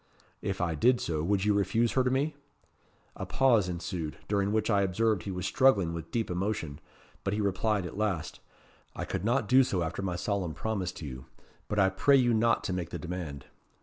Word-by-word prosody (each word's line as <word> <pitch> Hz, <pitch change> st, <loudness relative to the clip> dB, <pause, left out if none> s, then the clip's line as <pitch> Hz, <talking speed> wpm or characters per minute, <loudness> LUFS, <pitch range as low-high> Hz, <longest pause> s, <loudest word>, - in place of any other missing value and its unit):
'If 95 Hz, 0 st, -3 dB
I 85 Hz, -2 st, 0 dB
did 120 Hz, -, +3 dB
so, 80 Hz, -2 st, -2 dB
would 95 Hz, +4 st, +1 dB
you 105 Hz, -, +4 dB
refuse 110 Hz, +3 st, +1 dB
her 130 Hz, -, +2 dB
to 125 Hz, -, +1 dB
me?' 140 Hz, +4 st, 0 dB, 0.8 s
A -, -, -5 dB
pause 115 Hz, -8 st, +3 dB
ensued, 85 Hz, -4 st, -4 dB
during 100 Hz, -1 st, +1 dB
which 110 Hz, 0 st, +1 dB
I 100 Hz, -3 st, +3 dB
observed 100 Hz, +1 st, +1 dB
he 95 Hz, -, -5 dB
was 90 Hz, -1 st, -4 dB
struggling 100 Hz, -11 st, +3 dB
with 85 Hz, -1 st, -6 dB
deep 115 Hz, -6 st, -2 dB
emotion, 90 Hz, -6 st, -2 dB, 0.4 s
but 100 Hz, +1 st, -1 dB
he -, -, -2 dB
replied 100 Hz, 0 st, 0 dB
at 90 Hz, +4 st, -6 dB
last, 100 Hz, -8 st, -2 dB, 0.6 s
'I -, -, -4 dB
could -, -, -3 dB
not 120 Hz, +1 st, +1 dB
do 130 Hz, +3 st, +6 dB
so 95 Hz, -8 st, -1 dB
after 80 Hz, +4 st, -3 dB
my 95 Hz, -2 st, -2 dB
solemn 90 Hz, -4 st, -2 dB
promise 100 Hz, -2 st, -2 dB
to 80 Hz, -, -8 dB
you; 65 Hz, -2 st, -7 dB, 0.4 s
but 105 Hz, -, -3 dB
I 95 Hz, -1 st, +5 dB
pray 140 Hz, +8 st, +4 dB
you 120 Hz, -2 st, +3 dB
not 115 Hz, +1 st, +2 dB
to 95 Hz, -, -2 dB
make 90 Hz, -2 st, -3 dB
the -, -, -5 dB
demand.' 85 Hz, -6 st, -6 dB
100 Hz, 210 wpm, -29 LUFS, 90-110 Hz, 0.8 s, do